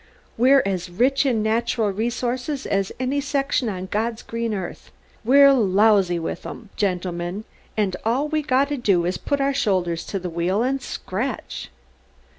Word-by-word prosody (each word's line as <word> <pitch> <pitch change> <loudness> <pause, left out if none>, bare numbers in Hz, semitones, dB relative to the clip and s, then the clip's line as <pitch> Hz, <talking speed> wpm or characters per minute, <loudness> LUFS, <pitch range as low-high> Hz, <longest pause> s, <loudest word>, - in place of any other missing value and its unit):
We're 265 +4 +5
as 185 -2 -2
rich 260 +9 +2
in 225 -5 +1
natural 225 -1 +1
resources 245 +6 -2
as 195 -1 0
any 265 +2 0
section 275 -3 0
on 185 -2 -4
God's 220 +4 -2
green 230 0 -3
earth. 190 -4 -5 0.3
We're 275 +4 +7
lousy 200 -5 +3
with 165 +1 -4
'em, 220 -4 -9
gentlemen, 180 0 -2 0.3
and 200 -4 +1
all 250 +7 +1
we 310 0 0
gotta 280 +1 +1
do 195 -8 +2
is 180 +1 -1
to - - -29
put 285 -1 0
our 275 0 +1
shoulders 185 -10 0
to 200 - -3
the 185 -1 -4
wheel 175 +5 0
and 270 +2 0
scratch!" 230 +2 -4
220 Hz, 160 wpm, -23 LUFS, 190-265 Hz, 0.3 s, We're